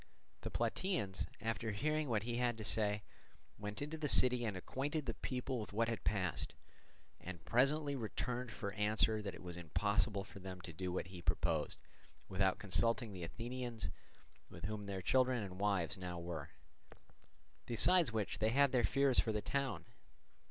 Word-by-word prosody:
The -, -, -3 dB
Plataeans, 165 Hz, -, 0 dB
after 110 Hz, 0 st, -1 dB
hearing 155 Hz, +6 st, 0 dB
what 110 Hz, -3 st, +1 dB
he 120 Hz, +1 st, -2 dB
had 120 Hz, -2 st, +1 dB
to 110 Hz, -, -5 dB
say, 105 Hz, -1 st, +2 dB, 0.6 s
went 105 Hz, +5 st, -4 dB
into 155 Hz, +2 st, -5 dB
the 150 Hz, -, 0 dB
city 125 Hz, -1 st, +7 dB
and 105 Hz, -4 st, -2 dB
acquainted 145 Hz, -, -2 dB
the -, -, -1 dB
people 130 Hz, 0 st, -2 dB
with 105 Hz, -, -6 dB
what 115 Hz, +2 st, +2 dB
had 115 Hz, -, -3 dB
passed, 95 Hz, -5 st, 0 dB, 0.6 s
and 90 Hz, -2 st, -8 dB
presently 140 Hz, +4 st, +3 dB
returned 125 Hz, 0 st, -3 dB
for 100 Hz, -2 st, -4 dB
answer 110 Hz, +1 st, +3 dB
that 100 Hz, -2 st, -4 dB
it -, -, -11 dB
was 90 Hz, -1 st, -6 dB
impossible 100 Hz, +4 st, +1 dB
for 100 Hz, 0 st, -11 dB
them 95 Hz, -1 st, -7 dB
to 85 Hz, -1 st, -8 dB
do 90 Hz, +3 st, -3 dB
what 90 Hz, 0 st, -2 dB
he 90 Hz, -2 st, -8 dB
proposed 80 Hz, -, +1 dB, 0.5 s
without 95 Hz, 0 st, +2 dB
consulting 115 Hz, +2 st, +1 dB
the 90 Hz, -, -7 dB
Athenians, 115 Hz, 0 st, -4 dB, 0.6 s
with 85 Hz, -, -8 dB
whom 105 Hz, 0 st, -4 dB
their 95 Hz, -2 st, -3 dB
children 125 Hz, +1 st, +3 dB
and 95 Hz, -1 st, -7 dB
wives 100 Hz, -2 st, +1 dB
now 90 Hz, -1 st, -4 dB
were; 85 Hz, -4 st, -5 dB, 1.2 s
besides 160 Hz, +6 st, +4 dB
which 110 Hz, -3 st, -1 dB
they 110 Hz, -, +3 dB
had 140 Hz, +3 st, +4 dB
their 125 Hz, -2 st, +3 dB
fears 135 Hz, +4 st, +4 dB
for 110 Hz, -, +3 dB
the 105 Hz, -, 0 dB
town. 140 Hz, -2 st, -1 dB
110 Hz, 170 wpm, -38 LUFS, 95-125 Hz, 1.2 s, city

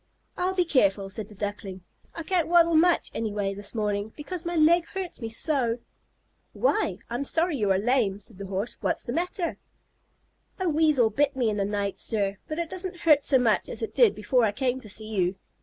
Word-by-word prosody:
"I'll 370 Hz, +1 st, -1 dB
be 360 Hz, -2 st, +2 dB
careful," 200 Hz, -, +2 dB
said 210 Hz, 0 st, -3 dB
the 210 Hz, -, -14 dB
Duckling. 200 Hz, -2 st, -5 dB, 0.3 s
"I 330 Hz, -, -5 dB
can't 350 Hz, 0 st, 0 dB
waddle 335 Hz, 0 st, +5 dB
much 340 Hz, +2 st, +3 dB
anyway 205 Hz, -3 st, -2 dB
this 205 Hz, +3 st, -3 dB
morning, 210 Hz, -1 st, -1 dB
because 340 Hz, +3 st, -6 dB
my 345 Hz, 0 st, -2 dB
leg 330 Hz, +2 st, +4 dB
hurts 375 Hz, -7 st, -6 dB
me 225 Hz, -, -4 dB
so." 240 Hz, -1 st, +1 dB, 0.8 s
"Why, -, -, +1 dB
I'm 240 Hz, +4 st, -3 dB
sorry 325 Hz, +2 st, +1 dB
you 210 Hz, -4 st, 0 dB
are 190 Hz, -, +3 dB
lame," 215 Hz, -2 st, +1 dB
said 205 Hz, -1 st, -13 dB
the 200 Hz, -, -6 dB
Horse. 195 Hz, +4 st, -3 dB
"What -, -, +1 dB
is -, -, -7 dB
the 240 Hz, -, -4 dB
matter?" 350 Hz, +2 st, -2 dB, 1.0 s
"A 375 Hz, -, 0 dB
Weasel 300 Hz, -7 st, +3 dB
bit 285 Hz, +5 st, +1 dB
me 240 Hz, -4 st, +1 dB
in 210 Hz, -, -3 dB
the 200 Hz, -, 0 dB
night, 200 Hz, -1 st, -2 dB
sir. 200 Hz, -3 st, -1 dB
But 310 Hz, -, -4 dB
it 340 Hz, -1 st, -2 dB
doesn't 370 Hz, 0 st, -5 dB
hurt 300 Hz, -4 st, +5 dB
so 270 Hz, -, +4 dB
much 235 Hz, -4 st, +1 dB
as -, -, -3 dB
it 450 Hz, -, -4 dB
did 475 Hz, -4 st, +4 dB
before 235 Hz, +4 st, +1 dB
I 215 Hz, -, +3 dB
came 255 Hz, +4 st, -1 dB
to 215 Hz, -, -11 dB
see 215 Hz, +2 st, -5 dB
you. 190 Hz, -4 st, 0 dB
245 Hz, 210 wpm, -26 LUFS, 205-330 Hz, 1.0 s, waddle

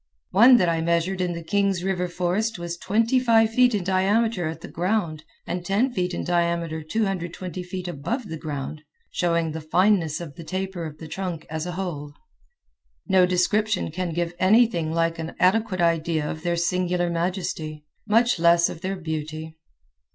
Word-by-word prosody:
One 240 Hz, +7 st, +8 dB
that 180 Hz, -, +2 dB
I 165 Hz, -1 st, +1 dB
measured 170 Hz, +3 st, 0 dB
in 180 Hz, -1 st, 0 dB
the 170 Hz, 0 st, -6 dB
Kings 195 Hz, 0 st, +1 dB
River 180 Hz, -1 st, -1 dB
forest 180 Hz, +6 st, -1 dB
was 170 Hz, 0 st, -4 dB
twenty 225 Hz, +8 st, +1 dB
five 225 Hz, -3 st, +4 dB
feet 250 Hz, -1 st, +4 dB
in 200 Hz, -, -1 dB
diameter 195 Hz, +1 st, +1 dB
at 160 Hz, -, -6 dB
the -, -, -8 dB
ground 175 Hz, -4 st, -1 dB, 0.2 s
and 175 Hz, 0 st, -3 dB
ten 210 Hz, +8 st, +1 dB
feet 180 Hz, -4 st, -1 dB
in -, -, -3 dB
diameter 170 Hz, -2 st, 0 dB
220 185 Hz, -1 st, -3 dB
feet 180 Hz, 0 st, -6 dB
above 205 Hz, -, -3 dB
the 160 Hz, -, -5 dB
ground 150 Hz, 0 st, -5 dB, 0.3 s
showing 170 Hz, -2 st, 0 dB
the 160 Hz, +1 st, -5 dB
fineness 175 Hz, 0 st, +2 dB
of 165 Hz, -5 st, -7 dB
the 170 Hz, -, -8 dB
taper 185 Hz, 0 st, -4 dB
of 155 Hz, -1 st, -10 dB
the 160 Hz, -, -9 dB
trunk 170 Hz, -1 st, -5 dB
as 160 Hz, +1 st, -3 dB
a 180 Hz, -, -4 dB
whole. 155 Hz, -6 st, -5 dB, 0.9 s
No 190 Hz, -2 st, +4 dB
description 205 Hz, +2 st, +1 dB
can 180 Hz, +1 st, -3 dB
give 170 Hz, +1 st, -2 dB
anything 185 Hz, -5 st, +3 dB
like 165 Hz, 0 st, 0 dB
an 165 Hz, 0 st, -5 dB
adequate 190 Hz, 0 st, +2 dB
idea 165 Hz, -2 st, +1 dB
of 155 Hz, -, -5 dB
their 175 Hz, 0 st, 0 dB
singular 175 Hz, 0 st, 0 dB
majesty, 165 Hz, -3 st, -3 dB, 0.2 s
much 230 Hz, -1 st, +3 dB
less 170 Hz, 0 st, +5 dB
of 160 Hz, -, -8 dB
their 190 Hz, +2 st, -2 dB
beauty. 160 Hz, -2 st, -5 dB
175 Hz, 175 wpm, -24 LUFS, 165-195 Hz, 0.9 s, One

